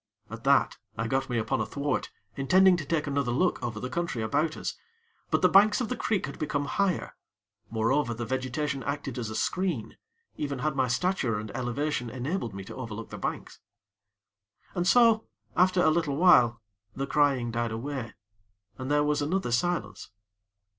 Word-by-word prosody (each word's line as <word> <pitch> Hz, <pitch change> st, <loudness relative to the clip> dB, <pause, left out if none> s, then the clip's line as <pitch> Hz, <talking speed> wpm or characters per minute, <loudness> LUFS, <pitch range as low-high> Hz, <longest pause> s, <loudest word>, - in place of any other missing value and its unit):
At -, -, -8 dB
that, -, -, +3 dB, 0.2 s
I 115 Hz, -, -1 dB
got 135 Hz, +3 st, 0 dB
me 120 Hz, -, 0 dB
upon 115 Hz, 0 st, 0 dB
a -, -, 0 dB
thwart, 145 Hz, -1 st, -2 dB, 0.3 s
intending 185 Hz, +7 st, +5 dB
to 155 Hz, -, -5 dB
take 155 Hz, +1 st, 0 dB
another 140 Hz, -3 st, -1 dB
look 175 Hz, +9 st, +1 dB
over 110 Hz, -2 st, -3 dB
the 125 Hz, -, -4 dB
country 130 Hz, -4 st, -2 dB
about 155 Hz, +8 st, 0 dB
us; -, -, -4 dB, 0.5 s
but -, -, +1 dB
the -, -, +8 dB
banks 205 Hz, +3 st, +5 dB
of 245 Hz, -, -2 dB
the 250 Hz, -, -1 dB
creek 210 Hz, -6 st, 0 dB
had 140 Hz, -, -8 dB
become 145 Hz, -2 st, -1 dB
higher; 195 Hz, +3 st, -1 dB, 0.5 s
moreover 115 Hz, +3 st, +1 dB
the 120 Hz, +1 st, -4 dB
vegetation 130 Hz, +3 st, -2 dB
acted 140 Hz, -3 st, -4 dB
as 115 Hz, -3 st, -3 dB
a 110 Hz, -, -5 dB
screen, 165 Hz, -, -1 dB, 0.4 s
even 140 Hz, -2 st, -2 dB
had 135 Hz, +3 st, -1 dB
my 130 Hz, -2 st, +2 dB
stature 125 Hz, -, 0 dB
and 105 Hz, 0 st, -6 dB
elevation 125 Hz, +1 st, -2 dB
enabled 130 Hz, -, -3 dB
me 100 Hz, -, -6 dB
to -, -, -9 dB
overlook 115 Hz, -3 st, -7 dB
the -, -, -7 dB
banks. -, -, -4 dB, 1.1 s
And 175 Hz, -1 st, -1 dB
so, 230 Hz, +1 st, +5 dB, 0.3 s
after 180 Hz, 0 st, +4 dB
a 155 Hz, -, +5 dB
little 155 Hz, -3 st, 0 dB
while, 125 Hz, -9 st, +5 dB, 0.3 s
the 135 Hz, -, -2 dB
crying 140 Hz, -5 st, +2 dB
died 120 Hz, 0 st, -1 dB
away, 115 Hz, 0 st, -5 dB, 0.6 s
and 130 Hz, +1 st, -4 dB
there 145 Hz, 0 st, +3 dB
was 150 Hz, 0 st, +1 dB
another 155 Hz, -2 st, -1 dB
silence. 175 Hz, +9 st, -1 dB
140 Hz, 175 wpm, -28 LUFS, 120-170 Hz, 1.1 s, the